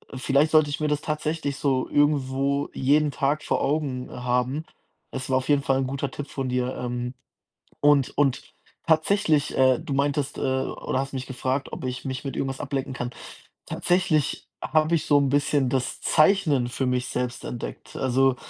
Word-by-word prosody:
vielleicht 140 +4 +2
sollte 155 -2 +5
ich 145 - -3
mir 150 - +1
das 150 0 0
tatsächlich 150 -2 -2
so 130 -3 +1
irgendwo 140 -1 +1
jeden 145 +3 +2
Tag 145 +2 0
vor - - 0
Augen 135 -4 -1
haben. 125 +4 -1 0.5
Es 130 0 -5
war 130 - +3
auf 130 - -3
jeden 145 -1 +4
Fall 135 -1 +2
'n 135 - 0
guter 140 +1 -3
Tipp 145 0 -6
von 135 -2 -3
dir, 125 0 -1
ähm. 125 0 -3 0.7
Und 145 -2 +3
und 135 -3 +2 0.4
tatsächlich, 160 -2 +2
äh, 130 -1 +5
du 140 - -4
meintest 140 0 0
äh, - - -3
oder 130 0 -1
hast 135 +1 -5
mich 130 -1 -4
gefragt, 130 +1 -2
ob - - -6
ich 130 0 -4
mich 130 +1 -4
mit 135 - -4
irgendwas 135 -1 -2
ablenken 135 -1 -3
kann. 125 0 -3 0.6
Tatsächlich 175 -5 0 0.2
habe 155 +1 +2
ich 160 - -3
so 145 - +5
'n 140 -2 +2
bisschen 145 -1 +2
das 130 -1 -2
Zeichnen 155 -7 +3
für 130 +2 -2
mich 125 0 0
selbst 125 0 -3
entdeckt. 120 - -7
Also, 130 0 +2
135 Hz, 180 wpm, -25 LUFS, 130-145 Hz, 0.7 s, sollte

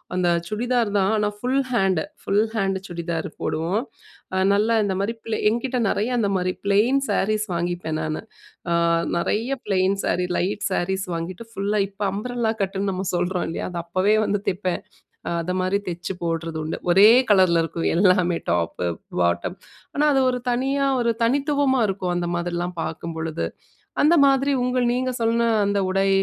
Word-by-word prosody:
அந்த 180 -1 +1 0.2
சுடிதார் 235 +2 0
தான். 195 +1 +2
ஆனா 210 -1 +1
full 255 +4 +1
hand. 195 -7 +2 0.2
Full 205 +2 +2
hand 195 -3 0
churidar 170 -2 -3
போடுவோம். 170 +7 -1 0.5
அ - - +1 0.2
நல்லா 215 +3 +2
இந்த 200 -2 0
மாரி 200 +4 -1
பிளே 220 -1 -1
என்கிட்ட 240 +3 -1
நெறைய 210 +4 0
அந்த 210 -4 +1
மாரி 185 0 0
பிளெயின் 215 +7 +3
சாரீஸ் 215 +1 +1
வாங்கிப்பேன் 170 -2 -2
நானு. 155 0 -3 0.5
அ, - - +3 0.4
நெறைய 225 +9 0
ப்ளெயின் 195 -1 +1
சாரி, 180 - 0
லைட் 200 +3 -1
சாரீஸ் 190 +1 -1
வாங்கிட்டு 175 +6 -5
ஃபுல்லா, 205 0 -1
இப்ப 200 +1 -17
அம்ப்ரெல்லா 235 +2 -1
கட்டுன்னு 195 +1 -1
நம்ம 190 +1 -3
சொல்றோம் 175 +1 0
இல்லையா? 165 - -3
அத 175 - -4
அப்பவே 185 +5 +2
வந்து 205 -1 0
தெப்பேன். 185 -1 -2 0.6
அத 170 +2 -3
மாரி 185 +2 +1
தெச்சு 175 +2 -4
போடுறது 165 -1 -2
உண்டு. 155 - -3
ஒரே 195 +4 +8 0.2
கலர்ல 185 -4 +5
இருக்கும் 165 +1 -2
எல்லாமே 180 -2 +3
டாப்பு, 85 0 -1 0.3
பாட்டம். 85 0 0 0.4
ஆனா 295 - +2
அது 270 - +3
ஒரு 250 -1 -3
தனியா 270 +3 +1
ஒரு 235 -1 +2
தனித்துவமா 275 +1 +2
இருக்கும். 185 -2 -2
அந்த 175 -1 -2
மாதிரிலாம் 175 0 -3
பார்க்கும்பொழுது. 160 0 -4 0.6
அந்த 315 +4 +5
மாதிரி 275 +1 +2
உங்கள் 250 -1 +1
நீங்க 255 +1 -1
சொன்ன 230 0 +2 0.2
அந்த 200 0 +1
உடை, 195 +1 +2
195 Hz, 160 wpm, -23 LUFS, 175-230 Hz, 0.6 s, ஒரே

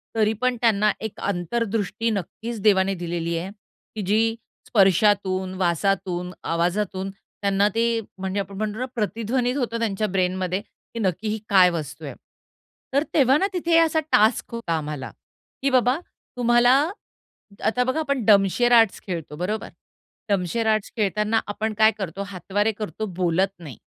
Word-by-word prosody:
तरी 220 -1 +2
पण 255 0 +2
त्यांना 210 -3 +3
एक 220 - -6
अंतर्दृष्टी 210 +3 -1
नक्कीच 220 +3 -4
देवाने 195 -2 +3
दिलेली 170 -1 -3
आहे, 180 +3 -4 0.5
की 215 - -3
जी 225 +2 +2 0.3
स्पर्शातून, 190 -2 +3
वासातून, 180 0 0
आवाजातून 185 +3 -1
त्यांना 200 +1 -1
ते 230 0 +2 0.2
म्हणजे 190 +1 -3
आपण 195 0 -5
म्हणतो 215 +1 -3
ना 255 - -1
प्रतिध्वनीत 230 +4 -1
होतं 235 -3 -2
त्यांच्या 215 -2 0
ब्रेनमध्ये, 185 0 -1
की 230 - -13
नक्की 190 +1 -1
ही 215 +1 -1
काय 185 -2 +6
वस्तू 160 -5 -5
आहे? - - -6 0.8
तर 280 +2 +3
तेव्हा 270 -2 +5
ना 385 - +1
तिथे 335 -2 +2
असा 320 -1 +3
टास्क 215 +2 +3
होता 230 -8 -2
आम्हाला 150 -3 -5 0.5
की 275 - +2
बाबा 255 0 +3 0.4
तुम्हाला 240 0 +4 0.9
आता 250 +3 +2
बघा 260 +5 -1
आपण 280 -5 -1
डमशेर 205 +4 +4
आर्ट्स 225 -4 +5
खेळतो 165 -5 -5
बरोबर, 205 +6 -3 0.6
डमशेर 200 +4 0
आर्ट्स 215 -2 +1
खेळताना 210 +1 +1
आपण 215 +2 -2
काय 220 0 +6
करतो 195 -1 -4
हातवारे 200 +3 -1
करतो, 215 0 -5
बोलत 180 -1 +1
नाही. 145 -9 -10
205 Hz, 145 wpm, -23 LUFS, 185-230 Hz, 0.9 s, काय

